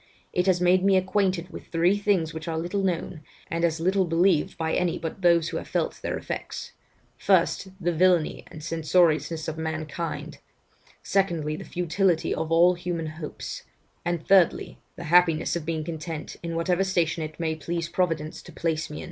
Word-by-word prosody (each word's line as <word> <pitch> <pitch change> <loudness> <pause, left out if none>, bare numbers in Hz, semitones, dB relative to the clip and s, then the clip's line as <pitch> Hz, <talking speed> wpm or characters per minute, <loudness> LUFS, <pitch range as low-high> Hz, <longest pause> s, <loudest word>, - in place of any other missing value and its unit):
It 180 +1 +1
has 185 -2 +4
made 180 +1 +4
me 195 -1 +5
acquainted 185 -2 0
with - - -9
three 175 +3 +2
things 200 -6 +1
which 160 0 -7
are 165 -1 -2
little 175 +5 -1
known, 175 -3 -2 0.3
and 165 +1 -1
as 165 -1 +1
little 190 +3 +2
believed 170 -1 +2
by 160 -1 -1
any 180 -2 +1
but 165 +3 -6
those 170 -2 +4
who - - -3
have - - -6
felt - - -2
their - - -2
effects: - - -6 0.5
first, - - +2
the 175 -1 0
villany 175 -1 +2
and 155 - -10
censoriousness 160 -1 +1
of 160 0 -4
mankind; 160 +1 -4 0.6
secondly, 170 -6 0
the - - -7
futility 175 0 0
of 160 0 -3
all 175 +2 +6
human 175 -2 -3
hopes; 155 0 -6 0.4
and 175 -2 -2
thirdly, 190 -4 +3 0.2
the - - -8
happiness 170 -1 +3
of 165 -2 -4
being 160 -2 -1
content 160 -1 -6
in 170 -1 -4
whatever 175 +3 +1
station 175 -4 0
it 155 0 -6
may 160 -1 0
please 170 +2 -3
Providence 165 -4 -1
to - - -13
place 160 -2 -2
me. 150 - -7
170 Hz, 175 wpm, -26 LUFS, 160-180 Hz, 0.6 s, all